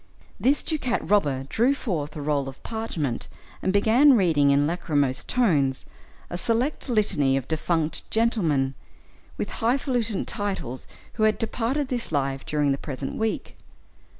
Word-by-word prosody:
This 280 +3 +2
ducat 275 -7 0
robber 145 -10 +2
drew 240 - +2
forth 155 - -3
a 150 - -5
roll 140 -2 0
of 135 - -13
parchment, 175 - -3 0.3
and 190 - +1
began 235 +7 +5
reading, 160 -7 +3
in 140 +1 +4
lachrymose 145 -5 0
tones, 150 - +1 0.4
a 175 - -4
select 245 +7 0
litany 175 - +2
of 135 -1 -4
defunct 160 0 -1
gentlemen, 170 - +1 0.6
with - - -3
hifalutin 240 -3 0
titles 200 - -3 0.3
who 220 - -1
had 215 - -2
departed 250 +5 -1
this 240 -7 -3
life 135 -2 -1
during 150 -2 +1
the 135 - -1
present 135 -2 -5
week. 220 0 -2
180 Hz, 140 wpm, -25 LUFS, 140-230 Hz, 0.6 s, began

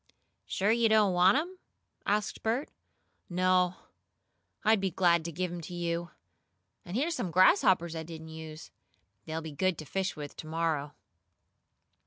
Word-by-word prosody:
"Sure 200 +3 +1
you 230 0 +3
don't 215 -3 +4
want 180 +6 +5
them?" 360 +4 -3 0.5
asked 210 +1 0
Bert. 235 +6 -1 0.6
"No. 180 0 +2 0.9
I'd 220 -2 +4
be 195 - +1
glad 170 -2 +3
to 170 - -3
give 180 +2 -2
'em 175 -1 -5
to 175 +2 -8
you. 170 0 -2 0.7
And 175 +5 -4
here's 320 +6 +1
some 190 - -2
grasshoppers 175 -1 +4
I 160 - -3
didn't 160 0 -9
use. 160 0 -9 0.5
They'll 160 +1 -4
be 160 - -6
good 185 +4 0
to 155 - -7
fish 190 +5 -2
with 145 -1 -7
to 155 - -8
morrow." 160 -3 -1
175 Hz, 155 wpm, -30 LUFS, 160-195 Hz, 0.9 s, want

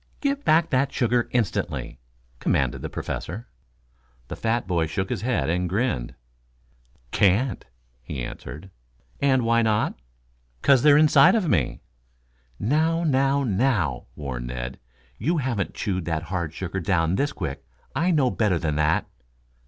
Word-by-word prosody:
"Give 280 0 -1
back 165 - +3
that 130 0 +2
sugar, 120 -1 +1
instantly!" 110 - -2 0.4
commanded - - 0
the - - -4
Professor. 110 +7 -5 0.8
The - - -4
fat 115 +1 -1
boy 85 -3 0
shook 95 +8 -3
his 115 -6 -2
head 110 - 0
and 90 +2 0
grinned. 95 - -1 1.0
"Can't," 105 +6 +2 0.4
he 65 +1 -5
answered. 80 +9 -8 0.5
"And, 130 -3 +3
why 115 0 +3
not?" 110 -2 +1 0.7
"'Cause 135 -3 +5
they're 145 -1 +6
inside 150 +2 +6
of 210 -6 +1
me." 80 - 0 0.8
"Now, 160 - +1
now, 140 -2 +2
now!" 105 - 0
warned 65 -4 -5
Ned. - - -5 0.4
"You 165 +9 +1
haven't 125 -8 -2
chewed 95 -4 -2
that 80 -1 -2
hard 85 -4 -1
sugar 95 +2 -4
down 85 -3 +1
this 140 +9 +1
quick. 75 -7 -5 0.3
I 170 +4 +2
know 145 -8 +3
better 105 -6 +1
than 75 -3 -1
that." 75 +1 +2
110 Hz, 140 wpm, -24 LUFS, 80-135 Hz, 1.0 s, they're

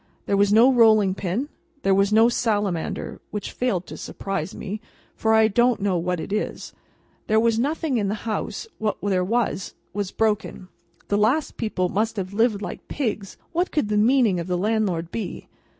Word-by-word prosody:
There 200 - +1
was 200 0 +3
no 235 +5 +6
rolling 215 -5 +5
pin, 195 +8 -2 0.4
there 195 - +3
was 195 +1 +3
no 220 +2 +6
salamander 205 -8 -1
(which 210 - -5
failed 200 -8 -1
to - - -9
surprise 195 0 -4
me, 210 +2 -5 0.3
for 220 0 +2
I 220 0 +6
don't 240 +2 +2
know 195 -2 0
what 180 0 -1
it 195 - -5
is), 215 - -3 0.5
there 220 0 +4
was 230 0 +2
nothing 290 -1 0
in 205 - 0
the 210 +3 -4
house, 220 - -3
what 215 -1 -1
there 190 -3 +1
was, 220 -2 -1 0.2
was 200 -1 -2
broken, 210 -4 -1 0.4
the 205 - +2
last 255 +9 +1
people 215 -5 -1
must 220 +5 -1
have 190 0 -4
lived 215 -1 +1
like - - -7
pigs, 215 -8 -3
what 350 +2 0
could 265 -9 0
the 210 - +1
meaning 220 -3 +3
of 170 - -4
the 180 -1 0
landlord 190 -4 0
be? 210 -6 -5
210 Hz, 180 wpm, -24 LUFS, 195-230 Hz, 0.5 s, no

